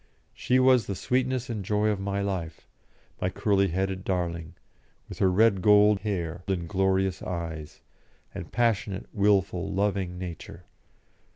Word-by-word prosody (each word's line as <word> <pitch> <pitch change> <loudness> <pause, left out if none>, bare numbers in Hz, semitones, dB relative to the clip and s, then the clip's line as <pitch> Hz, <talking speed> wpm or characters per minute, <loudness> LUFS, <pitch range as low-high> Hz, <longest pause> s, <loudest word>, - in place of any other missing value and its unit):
She 125 - +1
was 130 -3 +4
the 100 - -3
sweetness 130 +5 -1
and 110 -4 -4
joy 105 +2 +1
of 105 -2 -1
my 100 0 -2
life, 85 -5 -4 0.6
my 90 - +1
curly 100 0 +1
headed 95 +1 -2
darling, 85 -3 -3 0.5
with - - -10
her 95 - +4
red 100 0 +3
gold 105 0 +5
hair 90 -4 -3
and 90 -3 -2
glorious 95 0 +1
eyes, 80 -4 -6 0.5
and - - -8
passionate, 105 -4 0
wilful, 100 -4 +1
loving 95 -2 -1
nature. 90 -1 -8
95 Hz, 135 wpm, -27 LUFS, 90-105 Hz, 0.6 s, gold